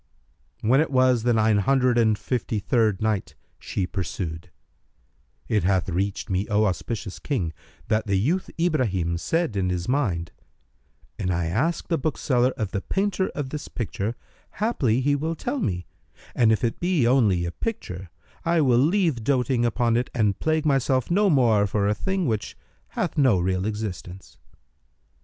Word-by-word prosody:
When 130 +6 +4
it 160 - 0
was 130 -3 +3
the 120 +2 +2
Nine 110 -2 +3
Hundred 130 +2 +2
and 110 -2 +3
Fifty 120 -2 -2
third 110 -1 +1
Night, 110 -3 -1 0.2
She 95 - -2
pursued, 85 -3 -5 1.0
It 105 -2 +1
hath 95 0 +1
reached 95 +3 -2
me, 95 +2 -1
O 105 +1 +3
auspicious 100 0 -3
King, 95 - -2 0.3
that 110 0 0
the 100 - +1
youth 160 - 0
Ibrahim 100 - 0
said 165 - -1
in 95 -2 0
his 90 -1 -2
mind, 100 -12 0 0.9
"An 90 - -1
I 90 -1 0
ask 125 - -1
the 165 -2 0
bookseller 130 -3 +1
of 105 -4 -2
the 100 - -2
painter 195 - -1
of 135 -3 -4
this 150 - -5
picture, 110 -1 -3 0.4
haply 135 - +1
he 145 +2 +2
will 160 +3 -2
tell 250 - -3
me; 90 - -2 0.5
and, 115 -2 +4
if 110 +3 +1
it 115 - -1
be 175 -7 +1
only 110 -9 +3
a 85 - -3
picture, 95 - -5 0.3
I 170 0 +2
will 125 -4 +4
leave 160 - +2
doting 125 -1 +1
upon 120 0 +1
it 125 - -1
and 105 -4 +1
plague 155 0 0
myself 135 -1 +1
no 200 +3 +4
more 115 - +4
for 100 +1 0
a 105 - +2
thing 190 - -2
which 110 -5 -2 0.3
hath - - -2
no 130 -9 +4
real 95 +2 0
existence." 100 -3 -6
115 Hz, 165 wpm, -24 LUFS, 100-140 Hz, 1.0 s, When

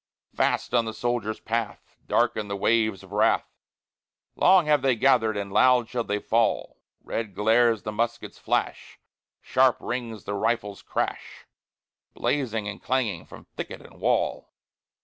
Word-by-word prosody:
Fast - - 0
on 120 -2 +3
the 110 -1 -5
soldier's 120 -3 -2
path 115 -1 -4
Darken 105 -1 +1
the 100 - -3
waves 110 -1 +1
of 95 - -15
wrath, 105 - +1 0.8
Long 185 -2 +5
have 150 -2 +3
they 130 -2 +2
gathered 115 -3 +3
and 100 -1 -5
loud 125 -3 +4
shall 120 -1 -2
they 105 -2 -2
fall; 115 +2 0 0.2
Red 110 -4 -4
glares 115 +1 +3
the 105 - -4
musket's 115 +2 -3
flash, - - -2 0.4
Sharp - - +3
rings 115 -4 -5
the 100 - -4
rifle's 105 -1 -1
crash, - - -4 0.7
Blazing 115 -7 -1
and 105 -1 -6
clanging 115 -10 -1
from - - -13
thicket - - -6
and - - -16
wall. - - 0
115 Hz, 145 wpm, -25 LUFS, 105-120 Hz, 0.8 s, Long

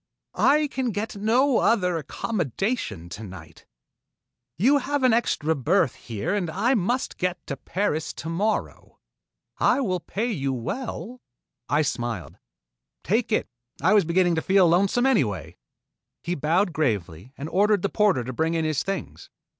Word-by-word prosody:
"I 300 +2 +4
can 260 -3 -2
get 215 +1 -3
no 235 +6 +3
other 180 -6 +2
accommodations 160 - -3
tonight. 90 -7 -11 0.9
You 265 - +4
have 285 +1 -2
an 255 -3 +5
extra 160 -9 +1
berth 160 - +2
here 115 - -4
and 195 -5 -1
I 235 +11 +1
must 245 +3 -1
get 180 -1 -2
to 140 - -4
Paris 165 -2 -2
tomorrow. 190 +7 -3 0.6
I - - +3
will 185 -9 0
pay 225 +8 -3
you 135 -8 -1
well 240 - -5 0.2
" 125 -1 -55
I 150 +2 +3
smiled. 120 - -4 0.6
"Take 225 +5 0
it. 215 - +1 0.3
I 185 +8 +3
was 210 - +5
beginning 175 +2 +2
to 160 - 0
feel 190 0 +4
lonesome, 195 +8 +3
anyway." 115 - +1 0.7
He 175 - -2
bowed 170 +4 +1
gravely 110 - -2
and 140 - -5
ordered 200 +3 +2
the - - +3
porter 205 -12 +2
to 130 +2 -5
bring 160 +5 0
in 160 -1 0
his 155 -2 0
things. 195 -6 -5
180 Hz, 150 wpm, -25 LUFS, 140-215 Hz, 0.9 s, an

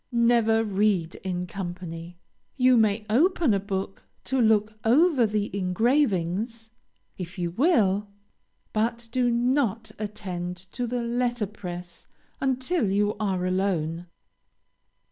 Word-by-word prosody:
Never 235 -2 +3
read 195 -5 +1
in 180 -1 -2
company. 175 -2 -7 0.4
You 255 -1 +5
may 215 -1 +2
open 300 - +3
a 200 - +2
book 195 0 -4 0.2
to 265 -1 0
look 220 -1 +3
over 265 +1 +4
the 210 -1 -2
engravings, 220 - 0 0.5
if 175 0 -6
you 175 -1 -2
will, 210 - +2 0.7
but 230 +2 -1
do 245 0 +2
not 235 -2 +1
attend 180 -4 -5
to 245 -1 -3
the 245 0 -2
letter 240 -1 0
press 180 -3 -8 0.3
until 260 - 0
you 205 +2 +1
are 190 -4 -1
alone. 180 -3 -1
215 Hz, 115 wpm, -26 LUFS, 185-240 Hz, 0.7 s, You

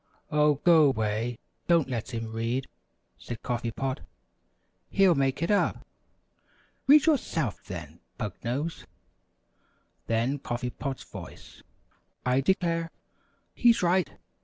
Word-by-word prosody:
"Oh, 150 0 +4
go 155 0 +5
'way! 110 0 -1 0.3
Don't 170 -5 +4
let 120 -3 -4
him 115 -2 -4
read," 115 +4 -1 0.5
said 120 -2 -7
Coffee 120 -1 -2
Pot; 130 +3 -3 0.9
"he'll 195 -3 +5
make 135 +1 0
it 170 - +1
up." 205 - +1 1.0
"Read 295 +2 +7
yourself, 165 - 0
then, 85 -4 -8 0.2
Pug 105 -4 -3
Nose!" 140 +8 -3 1.2
Then 120 +5 0
Coffee 125 -1 -3
Pot's 135 0 -5
voice: - - -11 0.6
"I 125 +2 +3
declare! 165 0 +1 0.6
He's 235 -5 +4
right! 180 -2 +3
135 Hz, 110 wpm, -28 LUFS, 115-165 Hz, 1.2 s, Read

